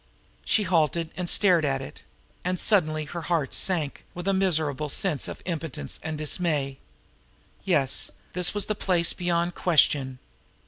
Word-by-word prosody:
She 215 - +2
halted 165 -2 +1
and 180 -2 -3
stared 180 -5 +4
at 135 -2 0
it 135 - -9 0.4
and 180 0 -1
suddenly 155 -7 +2
her 170 +3 -6
heart 160 -4 -1
sank 165 -7 0
with 175 +2 -6
a 195 - +3
miserable 155 -6 +1
sense 155 -1 0
of - - -8
impotence 160 - -4
and 160 -1 -4
dismay. 150 -3 -1 0.9
Yes, 140 -8 +1 0.2
this 180 +2 +1
was 205 - +2
the 215 - -1
place 180 -4 +1
beyond 175 0 0
question. 140 -7 +2
165 Hz, 145 wpm, -26 LUFS, 150-180 Hz, 0.9 s, stared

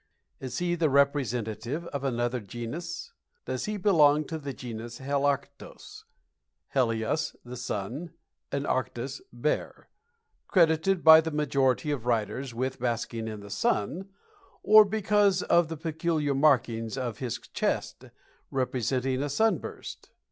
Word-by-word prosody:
Is 125 -2 -5
he 175 0 0
the 165 -3 +1
representative 135 0 0
of 140 -1 -3
another 120 -1 -1
genus? 155 - -6 0.3
Does 130 -1 -3
he 210 0 -3
belong 155 -7 +4
to 160 - -4
the 140 -2 -5
Genus 120 -2 -7
Helarctos 140 0 -3 0.7
(helios, 120 +4 0
the 125 +1 -7
"sun," 125 - -4 0.4
and 140 0 -2
arctos, 130 - -2
"bear") - - -3 0.6
credited 170 +1 +3
by 160 0 +10
the 160 - -3
majority 145 -1 +1
of 125 -5 -3
writers 120 +3 -1
with 130 +3 -3
basking 115 -2 -2
in 110 -2 -6
the 100 0 -11
sun, 160 - -1 0.5
or 215 0 +8
because 205 -2 +2
of 170 -1 +3
the 160 0 -6
peculiar 160 -2 -1
markings 125 -5 +2
of 120 -4 -3
his 125 -5 -3
chest, - - -3 0.4
representing 130 0 -1
a 145 - -2
sunburst? 220 +11 -2
140 Hz, 125 wpm, -28 LUFS, 120-160 Hz, 0.7 s, by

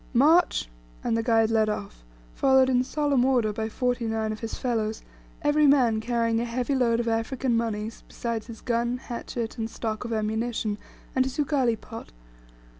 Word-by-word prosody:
"March!" 310 - +4 0.4
and - - +1
the 230 - +1
guide 225 -1 +3
led 220 -1 +3
off, 200 - -5 0.3
followed 265 -1 +4
in 250 0 +3
solemn 285 -2 +1
order 245 -5 +2
by 220 +1 -3
forty 245 0 -1
nine 220 -1 -1
of 215 - -5
his 225 - -5
fellows, 220 -3 -2 0.4
every 295 0 +4
man 245 -6 +4
carrying 230 -1 +1
a - - 0
heavy 245 +3 -1
load 235 -3 +2
of 235 - -1
African 235 +2 0
moneys, 225 -1 -2
besides 230 -2 -4
his 230 -2 -9
gun, 235 0 0
hatchet, 235 -2 -5
and 225 0 -2
stock 220 -1 -4
of 235 - -5
ammunition, 220 -1 -1 0.4
and 260 - +4
his 260 -1 -5
ugali 265 -6 +1
pot. 225 -1 -10
235 Hz, 175 wpm, -26 LUFS, 225-255 Hz, 0.4 s, March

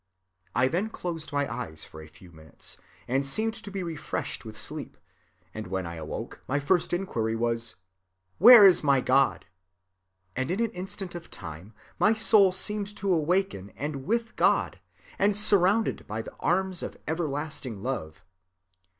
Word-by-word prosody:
"I 125 +1 +4
then 185 +10 -1
closed 170 -7 -5
my 145 -1 0
eyes 80 0 -5
for 80 - -11
a 75 - -11
few 85 +3 -17
minutes, 80 -1 -9 0.3
and 135 +3 +1
seemed 220 +12 0
to 225 -2 -8
be 195 -2 -4
refreshed 165 -3 -4
with - - -9
sleep; - - -3 0.6
and 110 -2 -6
when 95 0 -3
I 85 - -6
awoke, 80 -1 -6
the 145 +2 +1
first 170 +5 +1
inquiry 115 -12 -1
was, 115 0 -1 0.6
Where 225 +2 +10
is 185 -4 +6
my 140 -2 +4
God? 135 +2 +2 0.9
And 130 +1 -2
in 185 +4 -1
an 230 -1 0
instant 190 0 -6
of 175 -1 -8
time, 90 +4 -10 0.2
my 220 +1 +4
soul 215 -3 +5
seemed 205 +2 0
awake 185 +1 +2
in 100 +1 -9
and 140 -1 -4
with 230 +2 -1
God, - - +2 0.4
and 200 +1 +3
surrounded 205 +1 +3
by 110 +2 -4
the - - -10
arms 185 0 0
of - - -6
everlasting 145 - -3
love. 90 -9 -5
155 Hz, 160 wpm, -27 LUFS, -, 0.9 s, Where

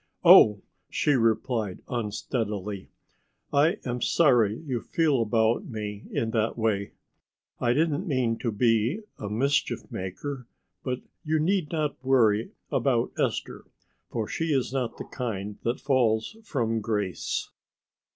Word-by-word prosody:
"Oh," 105 -2 +8 0.3
she 150 - +1
replied 115 -4 +1
unsteadily. 105 -3 -3 0.6
"I 155 +8 +4
am 125 -1 -3
sorry 120 -10 +3
you 130 -7 -4
feel 150 -7 +1
about 115 - +2
me 105 - -6
in 115 -1 -1
that 110 0 0
way. 105 -3 0 0.7
I 120 0 +2
didn't 160 +5 +1
mean 125 -6 0
to 120 - -1
be 115 - +2 0.2
a 105 - -4
mischief 135 +7 0
maker, 125 +8 -5 0.4
but 125 -1 -2 0.2
you 160 -1 +1
need 175 0 +1
not 150 -5 -2
worry 115 -5 +3 0.2
about - - +1
Esther, - - -2 0.4
for 110 -2 -2
she 165 - -2
is 135 -5 0
not 130 -3 -2
the - - -6
kind 105 -5 -5
that 120 +1 -1
falls 120 - +1
from 115 - -1
grace." 105 -4 -2
120 Hz, 130 wpm, -27 LUFS, 110-140 Hz, 0.7 s, Oh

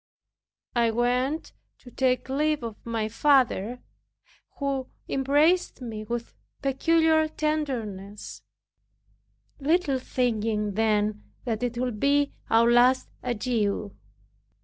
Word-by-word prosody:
I 235 -1 +3
went 250 +6 0 0.3
to 245 - -13
take 255 +1 +1
leave 295 +1 0
of 225 -2 -7
my 225 -2 -2
father, 250 -2 +2 0.7
who 275 -2 -2 0.2
embraced 290 +7 +2
me 220 -4 -6
with 235 +1 -4 0.3
peculiar 315 +3 +3
tenderness, 245 -11 -3 1.2
little 290 -2 +1
thinking 220 -5 -1
then 210 0 +1 0.2
that 225 -3 -2
it 245 -1 -2
would 245 -3 -2
be 285 +2 +2 0.2
our 230 +1 +5
last 250 +2 +4
adieu. 215 -4 -1
250 Hz, 100 wpm, -26 LUFS, 225-280 Hz, 1.2 s, our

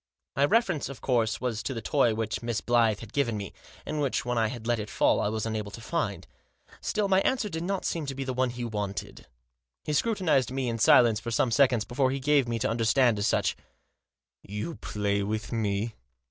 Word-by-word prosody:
My 140 - +4
reference, 190 - +1
of 140 - -8
course, 115 -4 +1
was 120 -4 -2
to 135 - -4
the - - -3
toy 115 0 +2
which 110 -1 -2
Miss 115 -2 -1
Blyth 115 -3 +2
had 115 -3 -11
given 120 -6 0
me, 100 -3 -6 0.3
and 150 - -2
which, 140 -4 0
when 125 0 -1
I 115 -1 +2
had 115 0 -7
let 120 -1 +1
it 105 0 -5
fall, - - +2
I - - +1
was 110 0 -2
unable 110 -2 -3
to 100 - -9
find. 115 - -2 0.6
Still 210 -1 0
my 190 0 +4
answer 245 -3 0
did 165 -2 -4
not 190 +2 -2
seem 160 -4 -2
to 135 - -4
be 135 - -3
the 130 -1 -3
one 130 0 +1
he 120 0 -5
wanted. 105 -3 -5 0.6
He 150 - -2
scrutinised 165 - +2
me 130 -1 -1
in 115 0 -3
silence 115 0 +6
for 120 - -6
some 115 +1 +1
seconds 120 -2 +3
before 130 +1 +1
he 135 +1 -2
gave 140 -1 +3
me 115 -1 -1
to 130 +4 0
under 115 0 -1
stand 120 -2 +3
as 100 - +2
much. - - +1 0.5
" - - -64 0.2
You 165 +11 -3
play 100 -1 -1
with 105 +1 -3
me 110 -1 -1
120 Hz, 225 wpm, -28 LUFS, 110-135 Hz, 0.6 s, silence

